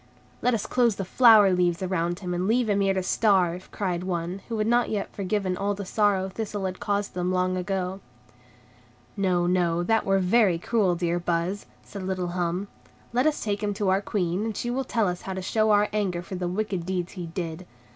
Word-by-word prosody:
"Let 250 -1 +2
us 215 - -3
close 240 -4 +2
the 195 - -4
flower 215 -2 +6
leaves 175 0 +1
around 175 -1 -1
him 180 -2 -3
and 180 +2 -1
leave 235 +2 +2
him 200 -1 +2
here 195 -1 +2
to 190 - 0
starve," 185 -3 +1
cried 180 -3 -2
one, 180 +1 -3
who 230 - -2
had 215 - 0
not 240 +2 +2
yet 210 -2 -3
forgotten 195 -1 -1
all 200 +2 -1
the 200 0 -6
sorrow 200 -1 +1
Thistle 205 0 -4
had 185 -1 -4
caused 205 -1 -1
them 180 0 -1
long 185 0 +1
ago. 185 0 -2 1.2
"No, 185 -3 +1
no, 175 -1 +1
that 225 +4 +2
were 195 0 +2
very 190 -1 +3
cruel, 190 0 +1
dear 175 0 -1
Buzz," 175 +3 -2 0.2
said 200 - -8
little 185 -1 -2
Hum; 175 +2 -2 0.5
"let 250 +5 +3
us 305 - 0
take 205 -1 -2
him 205 -1 -1
to 200 -2 0
our 190 +1 +2
Queen, 185 -1 -1
and 220 -2 -3
she 240 - -2
will 265 +2 -1
tell 225 -4 +1
us 180 0 -3
how 190 - -5
to 190 - -4
show 215 +3 +1
our 210 0 +4
anger 185 -5 -1
for 185 - -9
the 180 -1 -2
wicked 190 -1 -2
deeds 180 0 -3
he 180 -3 -6
did. 170 +1 -5
190 Hz, 215 wpm, -26 LUFS, 180-210 Hz, 1.2 s, flower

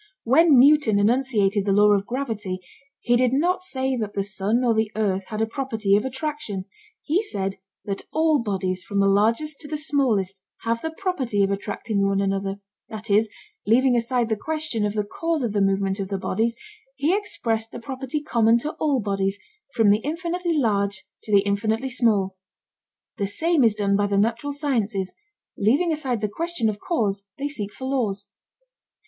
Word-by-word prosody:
When 290 +4 +5
Newton 275 -5 +5
enunciated 210 -2 +2
the 200 - +1
law 210 +1 +5
of 200 0 0
gravity 225 -8 -3 0.4
he 240 - +2
did 250 0 +2
not 355 +7 +2
say 265 -7 -2
that 215 -3 -4
the 200 - 0
sun 205 +5 0
or 240 -2 +3
the 220 -1 0
earth 195 -3 0
had 220 0 -2
a - - +3
property 225 -5 0
of 210 - +2
attraction; 265 -7 -4 0.4
he 340 +7 +1
said 195 - -3 0.3
that 200 -1 -5
all 315 -3 +2
bodies 190 -4 -2
from 200 +1 -3
the 195 - +4
largest 230 +10 +2
to 295 - -9
the 305 +1 -3
smallest 230 -11 0 0.2
have 230 0 -1
the 320 - -2
property 305 - -1
of 195 - +1
attracting 200 +1 -2
one 195 0 +1
another, 195 0 -1 0.3
that 215 0 -6
is, 215 +2 +4 0.4
leaving 250 +3 +4
aside 235 0 +1
the 220 - +1
question 305 -5 -2
of 205 - -3
the 210 - +1
cause 325 +7 -2
of 225 -4 -1
the 205 - +1
movement 195 0 +1
of 195 - -2
the 195 0 -2
bodies, 230 +4 -1 0.4
he 295 +7 +2
expressed 225 - -2
the - - -7
property 265 +4 -4
common 230 -4 +3
to 295 +6 -3
all 290 -4 +2
bodies 195 -1 -1 0.4
from 225 -4 +5
the 205 - +3
infinitely 340 +4 -2
large 200 -6 0 0.2
to 215 - -8
the 200 -1 +6
infinitely 220 +5 -1
small. 205 -6 +1 0.8
The 200 -3 -1
same 320 - +2
is 225 -3 +4
done 200 -2 +1
by 205 0 +2
the 200 -1 0
natural 230 +7 0
sciences: 230 -10 -1 0.5
leaving 280 - +3
aside 265 -8 -2
the 210 - +1
question 330 0 -1
of 205 -1 -4
cause, 205 - -1
they 280 - -2
seek 210 -9 -5
for 260 - -8
laws. 220 -7 -1
225 Hz, 185 wpm, -24 LUFS, 200-275 Hz, 0.8 s, the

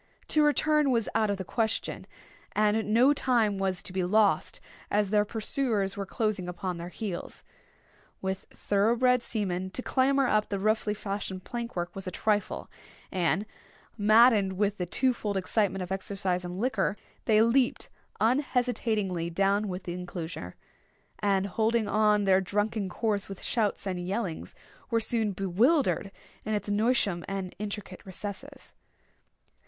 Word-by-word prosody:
To 305 - +3
return 300 0 +3
was 230 -4 +1
out 215 -1 +2
of 200 - 0
the 190 - -4
question, 225 +2 -2 0.5
and 210 0 +1
no 250 +6 +5
time 230 -8 +1
was 190 -1 0
to 185 - -4
be 185 -1 0
lost, 195 -2 +2 0.3
as 205 -1 +1
their 210 -1 +3
pursuers 215 -2 0
were 200 -1 -4
close 215 -1 -1
upon 180 0 -4
their 170 +1 -6
heels. 190 -2 -6 0.8
With 190 0 -4
thorough 205 +3 +1
bred 250 0 +3
seamen 190 -5 -2
to 250 +6 -4
clamber 275 +1 +2
up 215 -3 +1
the 200 - -1
roughly 215 +1 +1
fashioned 195 -2 -4
plank 235 -1 -5
work 175 0 -3
was 195 -1 -6
a - - 0
trifle; 205 +1 -1 0.4
and, 190 +3 +1 0.5
maddened 215 -2 +5
with 205 +1 0
the 180 - -2
twofold 220 -2 0
excitement 195 0 0
of 180 - -8
exercise 190 -1 -1
and 180 +1 -5
liquor, 210 -4 0 0.3
they 220 -1 +5
leaped 245 +2 +2 0.3
unhesitatingly 225 - 0
down 195 +4 +1
within 180 -1 -5
the 180 - -5
enclosure, 165 - -6 0.6
and 195 -2 +2
holding 220 +3 +1
on 210 -1 +3
their 190 -1 +4
drunken 205 +1 -1
course 205 +1 -1
with 195 - -8
shouts 220 -5 0
and 180 -2 -3
yellings, 195 -4 -3 0.3
were 230 -2 +2
soon 225 -1 0
bewildered 200 - +2 0.3
in 215 0 -1
its 205 - -3
noisome 205 -4 +1
and 195 -2 -4
intricate 205 -3 -6
recesses. 205 +9 -8
205 Hz, 150 wpm, -28 LUFS, 190-225 Hz, 0.8 s, no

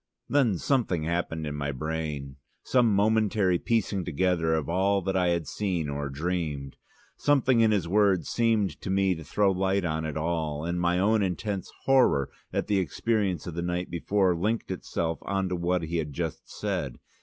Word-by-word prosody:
'" - - -61
Then 125 -9 +3
something 110 - 0
happened 80 -1 -2
in 75 - -3
my 70 0 -2
brain, 75 -1 -4 0.3
some 120 -3 +3
momentary 105 -3 +2
piecing 105 -4 0
together 85 -1 +1
of 80 -3 -2
all 95 +3 +1
that 95 +1 -1
I 90 -1 +2
had 85 -2 0
seen 90 -7 -2
or 70 0 -3
dreamed. 75 -2 -3 0.4
Something 130 -4 +3
in 115 -1 +5
his 100 -6 +1
words 95 -3 +3
seemed 115 -4 +1
to - - -5
me 95 0 +2
to 80 -2 -7
throw 100 +4 +2
light 95 0 0
on 80 -1 -1
it 80 -1 -3
all, 80 -2 -2
and 85 +1 -1
my 90 0 +2
own 105 +3 +3
intense 95 +1 -2
horror 130 - +4 0.2
at - - -1
the 100 -2 +1
experience 100 -1 -1
of 85 - -5
the 85 - -3
night 90 +1 -2
before 95 +1 +1
linked 105 +5 -1
itself 85 -2 -3
on 95 -1 -1
to 90 - -1
what 90 0 0
he 85 +2 -2
had 75 -3 -3
just 80 -1 -4
said. - - -3
90 Hz, 185 wpm, -27 LUFS, 80-100 Hz, 0.4 s, in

